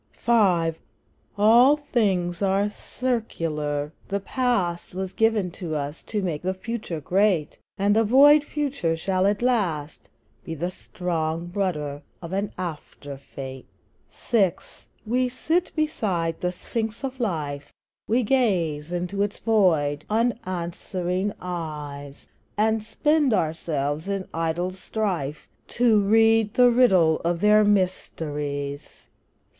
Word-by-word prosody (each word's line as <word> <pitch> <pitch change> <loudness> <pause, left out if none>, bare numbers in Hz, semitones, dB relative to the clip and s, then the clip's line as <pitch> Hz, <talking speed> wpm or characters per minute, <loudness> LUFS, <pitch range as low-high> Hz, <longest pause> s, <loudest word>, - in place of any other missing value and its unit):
V. 235 - +2 1.1
All 240 +7 +6
things 195 - 0
are 200 +1 +1
circular; 160 - -3
the 200 - -1
Past 195 -8 -1
Was 190 0 -4
given 220 -5 +1 0.2
us 145 +1 -4
to 210 -3 -3
make 165 -5 -2
the 185 +1 -2
Future 205 -4 -5
great; 180 0 +1 0.2
And 200 +1 +2
the 225 - +4
void 285 +6 +6
Future 280 - -2
shall 185 +3 +1
at 205 +3 0
last 175 -12 -1 0.3
Be 165 - -5
the 175 +4 -3
strong 170 -2 -3
rudder 150 -8 -2 0.2
of 170 +1 -8
an 200 +1 -1
after 155 -5 -6
fate. 135 -1 -9 0.4
VI. 195 -7 +1 0.5
We 250 +3 +1
sit 325 +8 -1
beside 190 - -1
the 180 - 0
Sphinx 220 +6 -4
of 265 -1 -4
Life, 150 - -3 0.4
We 240 +3 +2
gaze 175 - +1
into 180 +3 -2
its 205 0 -1
void, 160 -10 +2
unanswering 185 -3 -2
eyes, 150 -5 -6 0.3
And 220 +1 +2
spend 280 +4 +2
ourselves 155 -1 -2
in 195 -1 -3
idle 165 +2 -1
strife 185 -7 -3 0.3
To 230 -3 +5
read 225 +1 +3
the 245 -1 +6
riddle 190 -10 +4
of 170 0 -1
their 210 +2 +5
mysteries. 150 -8 -2
185 Hz, 120 wpm, -24 LUFS, 160-225 Hz, 1.1 s, All